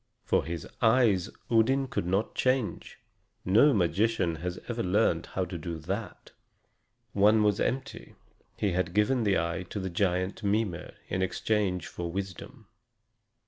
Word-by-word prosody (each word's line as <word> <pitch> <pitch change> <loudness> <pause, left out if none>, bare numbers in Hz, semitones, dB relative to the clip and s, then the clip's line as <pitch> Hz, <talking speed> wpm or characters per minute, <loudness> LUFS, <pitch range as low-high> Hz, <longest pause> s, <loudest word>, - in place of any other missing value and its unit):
For - - +1
his 85 -2 -5
eyes 110 -6 +3 0.2
Odin 130 +4 +3
could 105 -9 -3
not 95 +4 0
change 130 -4 -1 0.5
no 110 +11 +5
magician 95 - +1
has 90 +2 -4
ever 120 -1 -2
learned 90 -4 +1
how 95 - -2
to 90 -1 -6
do 85 0 -5
that. 95 +8 -6 0.8
One 105 +2 +4
was 105 -1 +2
empty; 135 +2 -3 0.4
he 100 - 0
had 90 0 -1
given 110 +3 +2
the 100 -2 +3
eye 85 +2 -1
to 105 - -4
the 95 -1 -4
giant 95 +2 0
Mimer 100 -4 -1
in 95 - -2
exchange 95 -1 0
for 85 -1 -5
wisdom. 95 +4 -7
100 Hz, 140 wpm, -28 LUFS, 90-110 Hz, 0.8 s, no